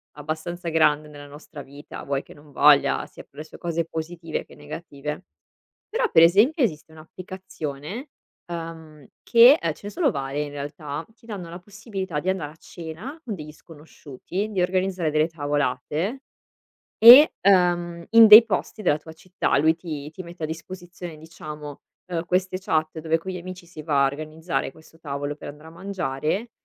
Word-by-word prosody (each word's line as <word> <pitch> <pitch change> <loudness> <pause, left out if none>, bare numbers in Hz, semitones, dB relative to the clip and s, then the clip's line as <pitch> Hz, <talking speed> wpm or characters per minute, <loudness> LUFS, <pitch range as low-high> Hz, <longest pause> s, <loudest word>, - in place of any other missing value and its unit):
abbastanza 160 +4 -5
grande 155 -2 +2
nella 145 -1 -12
nostra 145 +1 -11
vita, 140 +2 -11
vuoi 140 0 -2
che - - -15
non 145 0 -18
voglia, 145 0 +4
sia - - -13
per - - -17
le 155 - -6
sue - - -13
cose 170 -1 -2
positive 165 0 -5
che - - -17
negative. 150 +1 -7 0.6
Però, 470 0 0
per 165 - +7
esempio 215 - +4
esiste 160 -7 -2
un'applicazione, 175 - -8 0.4
uhm, 165 -3 -8 0.2
che, 240 +5 +7
ehm, 165 - -1
ce - - -20
ne 205 - -5
sono 315 -2 +1
varie 140 -2 -3
in 145 - -7
realtà, 145 +2 -6
ti 230 - -24
danno 195 -7 -7
la 170 +2 -8
possibilità 195 -3 -5
di 180 - -2
andare 175 -6 -2
a - - -22
cena 175 - -9
con 220 -8 -4
degli 150 -3 -9
sconosciuti, 160 +4 -7
di 190 -3 0
organizzare 185 -2 0
delle 155 +1 +2
tavolate 150 - -2 0.8
e, 250 +7 +10
uhm, 175 -3 +2
in 230 0 +9
dei 215 +2 +11
posti 220 0 -3
della 150 -5 +3
tua 160 +1 -12
città. 185 +3 -2
Lui 160 +2 +3
ti 155 -4 -7
ti 185 +3 -9
mette 170 -1 -10
a - - +2
disposizione, 175 +1 -8
diciamo, 150 -2 -9 0.3
uhm, 170 -1 -2
queste 185 +1 0
chat 160 -4 -1
dove 160 +1 +1
con 190 +3 -6
gli 185 - -5
amici 180 0 -9
si 160 -3 -10
va 145 -3 +2
a - - +5
organizzare 155 0 -4
questo 160 +2 -19
tavolo 145 -1 -4
per - - -9
andare 150 +2 -12
a - - -15
mangiare 185 - -3
165 Hz, 175 wpm, -24 LUFS, 150-185 Hz, 0.8 s, dei